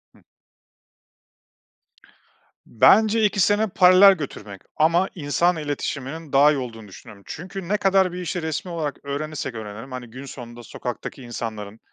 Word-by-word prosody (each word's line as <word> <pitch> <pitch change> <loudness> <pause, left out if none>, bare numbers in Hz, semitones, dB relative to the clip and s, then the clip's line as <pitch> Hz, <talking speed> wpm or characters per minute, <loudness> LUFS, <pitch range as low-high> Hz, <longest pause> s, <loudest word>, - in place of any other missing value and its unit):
Hı. - - -23 2.4
Bence 220 - +4
ikisini 205 +1 +2
paralel 185 +1 +7
götürmek. 105 - -8 0.2
Ama 170 +4 +3
insan 170 +2 +1
iletişiminin 145 0 -5
daha 145 +2 +6
iyi 150 - -1
olduğunu 115 -4 -7
düşünüyorum. 100 +1 -14
Çünkü 180 +2 -7
ne 210 +3 +1
kadar 195 -2 +2
bir 180 0 -6
işi 175 +1 -3
resmî 160 +3 -4
olarak 150 -4 -4
öğrenirsek 140 -2 -4
öğrenelim, 110 +3 -8
hani, 125 -1 -7
gün 130 +4 -10
sonunda 120 -3 -10
sokaktaki 125 +3 -7
insanların 110 -3 -6
150 Hz, 130 wpm, -23 LUFS, 120-180 Hz, 2.4 s, paralel